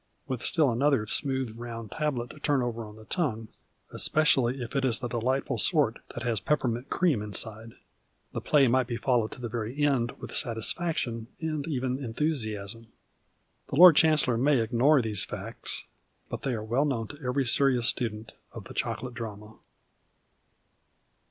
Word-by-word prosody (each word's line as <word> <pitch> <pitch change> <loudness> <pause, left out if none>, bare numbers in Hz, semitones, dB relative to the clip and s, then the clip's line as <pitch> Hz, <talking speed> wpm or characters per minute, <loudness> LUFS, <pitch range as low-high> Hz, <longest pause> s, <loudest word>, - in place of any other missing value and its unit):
With 130 -2 -3
still 155 -6 +2
another 130 -1 +2
smooth 130 0 -1
round 115 -2 -7
tablet 130 -6 -2
to 150 - -14
turn 145 -3 +1
over 120 -1 -3
on 105 0 -12
the 110 0 -14
tongue 115 - -2 0.4
(especially 135 -4 +2
if 115 - -8
it 135 - +1
is 125 -4 +2
the 125 - -4
deligiitful 125 +3 -1
sort - - +2 0.2
that - - -5
has 115 -4 0
i)epperniint 125 -1 -1
cream 165 - +2
inside) 110 +2 -3 0.6
the - - -3
play 145 -3 +4
might 130 0 +2
be 120 -2 -3
followed 120 -2 +1
to - - -10
the 120 - -4
very 120 +6 -2
end 130 -5 +2
with - - -9
satis 115 -2 +1
faction, 120 -10 -3
and 155 -2 -3
even 130 -2 -2
enthusiasm. 115 -5 -3 0.8
The - - -4
Lord 175 +1 +9
Chancellor 150 -7 +4
may 140 +1 +3
ignore 125 +5 +3
these 105 -4 +1
facts, - - -4 0.4
but - - -5
they 130 -3 -1
are 110 - -4
well 120 +7 +1
known 125 -6 -1
to 145 +1 -11
every 130 +2 0
serious 125 -1 +3
student 110 -3 -1 0.2
of - - -8
the - - -11
chocolate 125 -1 -3
drama. 110 -3 -7
125 Hz, 165 wpm, -28 LUFS, 115-140 Hz, 0.8 s, Lord